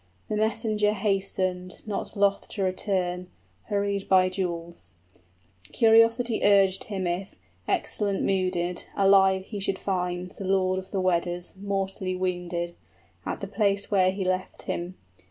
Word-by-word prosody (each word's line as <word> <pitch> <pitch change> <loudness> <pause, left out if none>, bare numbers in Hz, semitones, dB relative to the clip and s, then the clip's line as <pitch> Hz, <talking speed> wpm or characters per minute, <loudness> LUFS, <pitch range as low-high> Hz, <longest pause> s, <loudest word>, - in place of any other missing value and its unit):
The 215 - -1
messenger 215 -1 +1
hastened, 190 -3 -1
Not 210 +1 -4
loth 200 0 +2
to 200 - -2
return, 185 -1 -1 0.4
hurried 200 -1 -1
by 185 -1 +5
jewels: 170 - -5 0.8
Curiosity 230 +1 +4
urged 195 -2 +4
him 195 -3 -3
if, 175 +3 -3 0.3
excellent 200 -2 -1
mooded, 180 -2 0
Alive 195 -1 +5
he 205 -1 -6
should 195 0 0
find 180 -2 -2
the 195 - -8
lord 185 -1 +2
of 190 - -10
the 195 - -2
Weders 175 -1 0
35 - - -26
Mortally 195 -2 -2
wounded, 175 -2 -2 0.5
at - - -3
the 200 - -4
place 200 0 0
where 185 -2 +4
he 190 0 -2
left 185 0 -2
him. 175 +2 -4
190 Hz, 135 wpm, -26 LUFS, 185-200 Hz, 0.8 s, by